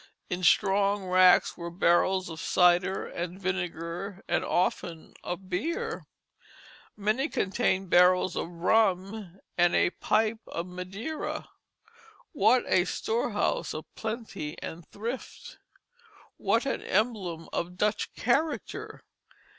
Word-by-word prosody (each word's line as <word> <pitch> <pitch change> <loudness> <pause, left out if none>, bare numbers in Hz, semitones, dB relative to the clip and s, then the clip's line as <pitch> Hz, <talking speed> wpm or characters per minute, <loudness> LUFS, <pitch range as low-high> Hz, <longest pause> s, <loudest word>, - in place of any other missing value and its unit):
In 180 0 -2
strong 200 +2 +3
racks 185 0 +5
were 170 0 -6
barrels 185 +2 +2
of 160 -2 -7
cider 180 +1 +3
and 175 +2 -5
vinegar, 180 0 -4
and 175 - +1
often 175 -2 -1
of 180 +2 -5
beer. 200 - -3 0.9
Many 215 +9 0
contained 190 -2 0
barrels 180 +1 +5
of - - -2
rum 195 +1 0 0.2
and 175 0 +4
a - - +3
pipe 220 +3 +1
of 170 - -4
Madeira. 190 - -5 0.8
What 245 -2 +4
a 180 -1 +3
storehouse 220 -1 -1
of 155 - -5
plenty 220 -9 -5
and 165 0 -8
thrift! 230 +5 -7 0.8
What 230 - +1
an 275 - -1
emblem 190 -6 -1
of 180 +1 -3
Dutch 210 +2 0
character! 280 +6 -1
185 Hz, 110 wpm, -28 LUFS, 175-215 Hz, 0.9 s, racks